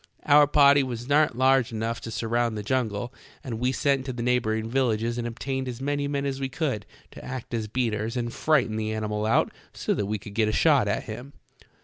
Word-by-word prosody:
Our 145 0 +6
party 140 -1 +6
was 120 -2 -4
not 145 -3 +3
large 130 -2 +3
enough 115 +1 -3
to - - -6
surround 115 0 -1
the 105 - -4
jungle, 120 -1 -1 0.3
and 115 -4 -5
we 125 +1 +1
sent 135 0 +1
to 130 - -3
the 120 -1 -4
neighboring 115 -3 0
villages 120 -2 0
and 120 - -2
obtained 130 +3 -3
as 125 -1 -5
many 145 +1 -1
men 140 -1 -2
as 135 -1 -2
we 135 -1 -2
could 130 -7 -2 0.2
to - - -11
act 125 -2 -7
as 110 -2 -2
beaters 115 0 -1
and 120 -1 -2
frighten 130 -8 +1
the 110 0 -2
animal 105 0 -2
out 110 - +2 0.2
so - - -1
that 100 - -2
we 105 +1 -1
could 100 +1 -11
get 110 0 +2
a - - +1
shot 140 -2 +4
at 100 - -1
him." 125 +6 -8
120 Hz, 220 wpm, -26 LUFS, 110-135 Hz, 0.3 s, Our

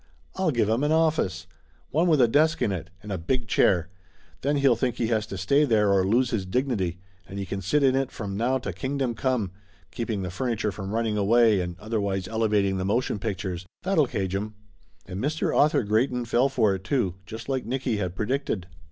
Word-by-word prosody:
"I'll 185 -2 +1
give 120 -7 +1
him 115 +5 +1
an 150 - +2
office! 155 - +1 0.5
One 165 +5 +2
with 155 -5 +4
a 120 - +6
desk 155 +7 +3
in 105 - +1
it 85 -2 -4
and 105 - -7
a 95 - -2
big 120 +8 -1
chair. 90 -5 +3 0.5
Then 145 +2 +1
he'll 140 -4 +4
think 125 -2 -1
he 115 -2 -1
has 110 -2 0
to 100 - -6
stay 140 +11 +3
there 105 -7 +3
or 95 -1 +3
lose 120 +6 +2
his 110 -5 0
dignity, 95 - -1 0.3
and 100 - -8
he 100 - -3
can 95 +1 -4
sit 145 +10 +1
in 130 -1 +4
it 135 -1 0
from 100 -3 -5
now 120 +5 +1
to 105 -7 -5
Kingdom 130 +5 -2
Come, 115 -5 -1 0.4
keeping 110 -4 -3
the 90 - -4
furniture 110 0 -1
from 95 0 -6
running 110 -1 0
away, 110 0 +4
and 90 -1 -5
otherwise 100 -4 -2
elevating 105 -3 +1
the 95 - -2
mo 105 +5 +2
tion 115 -4 -3
pictures. 95 -4 -4 0.2
That'll 180 -7 +2
cage 95 -4 -2
him 105 +2 -3 0.2
!" 80 0 -36
And 95 +4 -5
Mr. 155 +3 0
Author 150 -3 +4
Grey 110 +5 +2
ton 125 -2 -3
fell 120 +3 +2
for 115 -7 +2
it, 95 -1 -5
too, 115 -8 0
just 110 +1 -8
like 135 -2 -1
Nicky 130 -2 -1
had 90 -3 -3
predicted. 110 -3 -2
110 Hz, 220 wpm, -26 LUFS, 95-130 Hz, 0.5 s, a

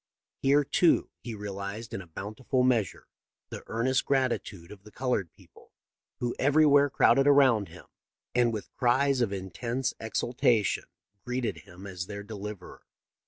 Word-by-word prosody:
Here 140 +2 +4
too 165 +4 +2
he 115 -2 -7
realized 100 +2 -6
in 95 - -4
a 90 - -13
bountiful 110 +9 -2
measure 120 -8 0 0.5
the - - -7
earnest 130 +3 0
gratitude 120 -10 -1
of 105 -2 -12
the 105 - -15
colored 110 -7 -2
people, - - -21 0.5
who 120 -1 -1
everywhere 145 0 +5
crowded 135 +1 +4
around 130 -8 +5
him - - -13 0.5
and 120 -1 +3
with 110 -2 -6
cries 130 +2 +2
of 115 -4 +1
intense 110 +7 -3
exultation 110 -1 0 0.4
greeted 125 -7 -2
him 90 +4 -13
as 90 -2 -6
their 100 0 -7
deliverer. 105 -2 -8
115 Hz, 140 wpm, -28 LUFS, 100-130 Hz, 0.5 s, everywhere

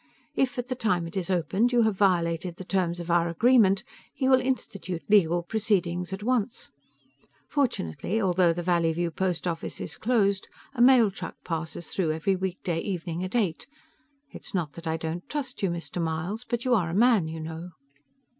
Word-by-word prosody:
If, 260 -2 0
at 245 0 -3
the 255 - -1
time 210 -8 0
it 165 - -8
is 190 -1 -2
opened, 190 +6 +1
you 240 -1 +4
have 220 -2 +2
violated 175 -3 +1
the 185 - -8
terms 180 -2 0
of 170 0 -4
our 170 0 +3
agreement, 200 +1 +4 0.3
he 260 - -1
will 260 -1 +5
institute 200 -9 -3
legal 175 -4 +4
proceedings 180 -3 0
at 190 +2 -5
once. 245 -1 -1 0.8
Fortunately, 225 - -1
although 180 -3 +3
the 175 +1 -3
Valleyview 170 -1 +1
post 180 -4 -1
office 170 -2 -3
is 155 - -6
closed, 200 -5 +1 0.3
a 245 - -1
mail 245 -4 +6
truck 180 -3 -7
passes 165 0 -4
through 165 -5 0
every 175 +5 0
weekday 185 -2 -2
evening 175 -2 -3
at 185 +5 -4
eight. 195 -9 0 0.6
It's - - -7
not 160 -6 -1
that 170 0 -8
I 160 0 0
don't 165 +2 -5
trust 275 -3 -4
you, 195 - +1
Mr. 170 +1 -4
Myles 165 +9 -3
but 240 0 -2
you 255 - +3
are 180 -8 +2
a 170 - -3
man, 220 -6 +4
you 160 0 -5
know." 160 +2 -6
185 Hz, 185 wpm, -27 LUFS, 170-220 Hz, 0.8 s, mail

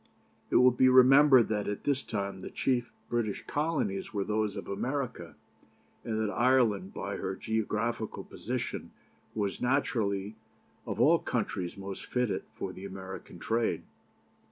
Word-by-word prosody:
It - - -1
will 125 0 +7
be 130 +1 +4
remembered 130 0 +7
that 105 -1 -1
at 105 - -3
this 140 -1 +1
time 100 -3 -4
the - - -7
chief 125 -2 0 0.2
British 115 -4 -1
Colonies 145 -11 -1
were 100 -2 -1
those 105 0 -1
of - - -6
America, 130 +5 -3 0.7
and 110 -1 -2
that 110 -1 -1
Ireland, 115 -7 +3
by - - -4
her 95 - -3
geographical 110 +1 -2
position, - - -4 0.5
was 100 -3 -2
naturally 110 -6 0 0.5
of - - -3
all - - +6
countries 90 +1 -2
most 95 0 -7
fitted 125 -4 0
for - - -4
the 95 - -10
American 95 -1 -8
trade. 115 0 0
110 Hz, 140 wpm, -30 LUFS, 100-125 Hz, 0.7 s, will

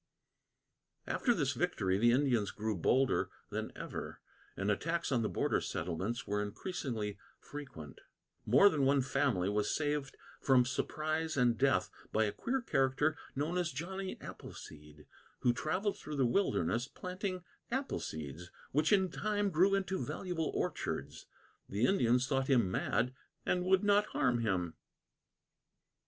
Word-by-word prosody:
After 245 - +1
this 145 - +1
victory, 100 - 0
the 120 +2 +5
Indians 125 -5 +2
grew 110 0 -2
bolder 130 +9 +2 0.2
than - - -3
ever, - - -6 0.4
and 100 +2 +1
attacks 165 +10 -1
on 125 -3 +2
the 110 - 0
border - - +1
settlements 95 +8 -3
were 105 0 0
increasingly 105 - -4 0.2
frequent. 110 - -9 0.4
More 130 - +6
than 155 -8 +2
one 135 0 +4
family 130 -9 +1
was 105 +1 +1
saved 145 -2 -1 0.2
from 130 -2 +5
surprise 155 +4 -1
and 120 -2 +4
death 135 +1 +2 0.2
by 110 - +3
a 105 - 0
queer 255 - -2
character 135 - +2 0.2
known 155 +6 0
as 175 -2 0
Johnny 185 +7 -5
Appleseed, 75 -1 -10 0.4
who 120 - +4
travelled 190 - -1
through 150 - -6
the 135 -2 +3
wilderness 120 - +1
planting 185 +2 -4 0.3
apple 265 +3 -1
seeds 80 +3 -6 0.2
which 150 +6 +2
in 190 -3 +4
time 205 0 0
grew 185 +5 +4
into 190 -1 -1
valuable 175 -4 -2
orchards. - - -3 0.4
The 105 +5 +1
Indians 125 -8 +3
thought 135 -1 0
him 120 -9 +4
mad 120 +6 0 0.3
and 180 0 +1
would 190 +1 +4
not 205 0 +4
harm 125 -3 +1
him. 90 -7 0
135 Hz, 140 wpm, -34 LUFS, 110-180 Hz, 0.4 s, More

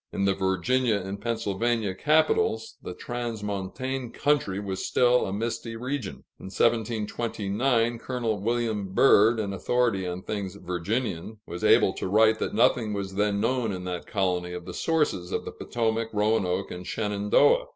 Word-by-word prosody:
In 100 - -1
the 100 - +3
Virginia 100 +6 +1
and 100 0 -4
Pennsylvania 115 -2 -1
capitals, 150 -4 +2
the 90 - -7
transmontane 120 +2 -4
country 140 -10 +1
was 95 -2 -4
still 125 0 +3
a - - -3
misty 115 +2 -3
region. 125 -2 -4 0.2
In - - -11
1729, 115 +2 0
Col. 115 -4 -2
William 110 -3 -1
Byrd, 115 -3 +5
an 100 -2 -2
authority 115 -3 0
on 90 +1 -5
things 100 -3 -4
Virginian, 100 +2 -3
was 85 - -7
able - - +5
to - - -4
write 110 +3 +4
that - - -2
nothing 115 -1 +3
was 100 -1 -4
then 100 0 +1
known 125 0 0
in 90 -2 -5
that 90 -1 -5
colony 90 -3 -1
of 90 -1 -7
the 90 - -7
sources 150 - 0
of - - -2
the - - -5
Potomac, 115 -1 -2
Roanoke, 105 -3 +1
and 90 0 -7
Shenandoah. 105 - +2
105 Hz, 150 wpm, -26 LUFS, 95-120 Hz, 0.2 s, Byrd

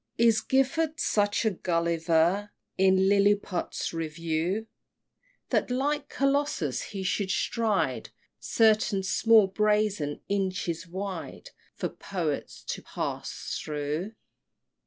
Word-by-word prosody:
Is 230 -2 +4
Gifford 310 +4 +1
such 205 -3 +1
a 220 - +3
Gulliver 170 +2 +1 0.3
In 190 0 +4
Lilliput's 200 -3 +1
Review, 165 +5 -2 0.8
That - - +1
like 285 +3 -1
Colossus 275 - 0
he 195 -2 -6
should 190 +1 -1
stride 195 - 0 0.3
Certain 215 -3 +3
small 220 +2 +5
brazen 210 -6 0
inches 185 -4 -2
wide 190 +2 -6 0.2
For - - -2
poets 165 -7 -4
to - - -3
pass - - -4
through? 150 +7 -3
195 Hz, 95 wpm, -28 LUFS, 170-220 Hz, 0.8 s, small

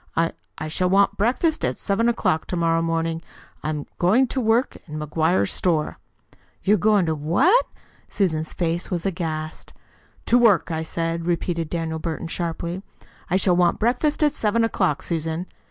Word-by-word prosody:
I 165 0 +2 0.3
I 155 - -4
shall 180 +4 0
want 195 +1 +3
breakfast 260 - +1
at - - 0
seven 225 +4 +1
o'clock 185 -9 0
to - - -3
morrow 165 -1 +2
morning. 165 0 -1 0.4
I - - -4
I - - 0
am 150 -2 -3
going 210 +9 +4
to 265 - -1
work 230 +3 +2
in 155 -1 -6
McGuire's 160 +3 +1
store." 165 -4 0 0.6
"You 200 - +4
are - - +4
goin' 205 0 +3
to 160 - 0
what?" 170 - +3 0.4
Susan's 160 -5 0
face 170 0 -1
was 175 -1 -2
aghast. 160 -4 -4 0.5
"To 245 - +4
work, 210 -8 +4
I 160 0 -1
said," 165 +1 -3
repeated 170 -1 -1
Daniel 160 -2 -3
Burton 165 +1 -4
sharply. 170 +1 -3 0.5
"I 180 - +3
shall 185 -2 +3
want 175 -1 +3
breakfast 250 +7 +1
at 295 -1 +3
seven 230 -3 +1
o'clock, 185 -9 0
Susan." 165 +1 -2
170 Hz, 170 wpm, -23 LUFS, 160-205 Hz, 0.6 s, going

